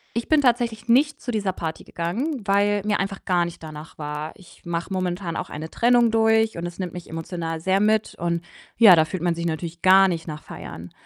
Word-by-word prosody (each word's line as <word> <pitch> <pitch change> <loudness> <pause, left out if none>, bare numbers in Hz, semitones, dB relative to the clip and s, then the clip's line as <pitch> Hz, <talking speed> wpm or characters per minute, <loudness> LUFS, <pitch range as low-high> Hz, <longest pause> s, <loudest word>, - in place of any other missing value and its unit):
ich 235 - -3
bin 310 -2 +5
tatsächlich 235 -2 +1
nicht 285 +6 +3
zu 245 - -4
dieser 200 -4 -1
Party 160 -3 -5
gegangen, 235 - -3
weil 200 0 +2
mir 210 -1 +1
einfach 195 0 -4
gar 175 -2 +2
nicht 170 -1 -9
danach 155 0 -10
war. 150 0 -5
Ich 190 -4 -18
mache 170 +2 -4
momentan 180 -2 -2
auch - - -4
eine 155 +2 -7
Trennung 240 -1 +3
durch 225 -1 +3
und 170 +1 -4
das 175 0 -7
nimmt 180 -3 -4
mich 175 -1 -9
emotional 165 0 -4
sehr 190 +2 +2
mit 215 +1 +1
und, 170 0 -1 0.3
ja, 210 -6 +9
da 160 -1 +4
fühlt 180 +1 -5
man 175 -1 +2
sich 170 0 -3
natürlich 165 +1 -4
gar 190 +1 +7
nicht 165 -2 -3
nach 150 -1 -7
feiern. 85 +2 -9
185 Hz, 215 wpm, -23 LUFS, 165-220 Hz, 0.3 s, ja